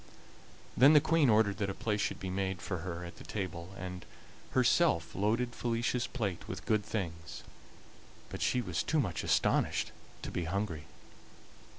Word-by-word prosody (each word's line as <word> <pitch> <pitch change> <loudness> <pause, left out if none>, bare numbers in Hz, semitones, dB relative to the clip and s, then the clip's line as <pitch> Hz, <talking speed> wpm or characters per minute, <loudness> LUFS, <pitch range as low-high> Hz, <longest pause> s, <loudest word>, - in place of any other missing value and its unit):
Then 140 +5 +7
the 150 - +9
Queen 155 -2 +3
ordered 105 -2 +4
that 100 -1 0
a 95 - -4
place 105 -2 -1
should - - -1
be 95 - -4
made 95 -1 -1
for 95 -2 -3
her 85 0 -5
at 85 - -10
the - - -10
table, 95 -2 -5
and 90 -1 -6 0.5
herself 130 - +3
loaded 115 +5 0
Felicia's 120 +1 0
plate 100 -9 -3
with - - -6
good 110 -1 +2
things; 85 -7 -5 0.9
but - - -6
she 125 - +2
was 90 -6 -1
too 160 - +1
much 90 -11 -1
astonished - - +2 0.3
to - - -4
be 90 - -2
hungry. 90 -3 -2
100 Hz, 165 wpm, -32 LUFS, 90-120 Hz, 0.9 s, the